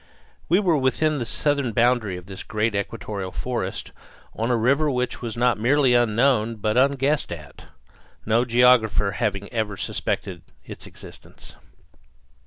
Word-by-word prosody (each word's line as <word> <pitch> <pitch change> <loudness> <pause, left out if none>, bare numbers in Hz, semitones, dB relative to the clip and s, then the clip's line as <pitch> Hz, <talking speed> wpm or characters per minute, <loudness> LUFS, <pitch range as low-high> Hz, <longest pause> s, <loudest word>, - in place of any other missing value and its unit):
We 175 +4 +4
were 175 -7 +2
within 145 +3 +1
the 120 - -3
southern 140 +1 0
boundary 115 -5 +2
of 90 - -11
this 95 0 -8
great 110 +1 -1
equatorial 100 -1 -4
forest, - - -4 0.4
on 115 +2 -2
a 120 - +2
river 140 +7 +2
which 125 -2 -2
was 115 -2 -5
not 120 -3 +2
merely 130 +2 +3
unknown 120 0 +2
but 105 0 -1
unguessed 140 +3 +1
at, 75 -3 -9 0.6
no 115 +2 +3
geographer 120 -4 +3
having 100 -1 -2
ever 110 -3 -2
suspected - - -3 0.2
its - - -9
existence. - - -11
120 Hz, 140 wpm, -23 LUFS, 105-130 Hz, 0.6 s, We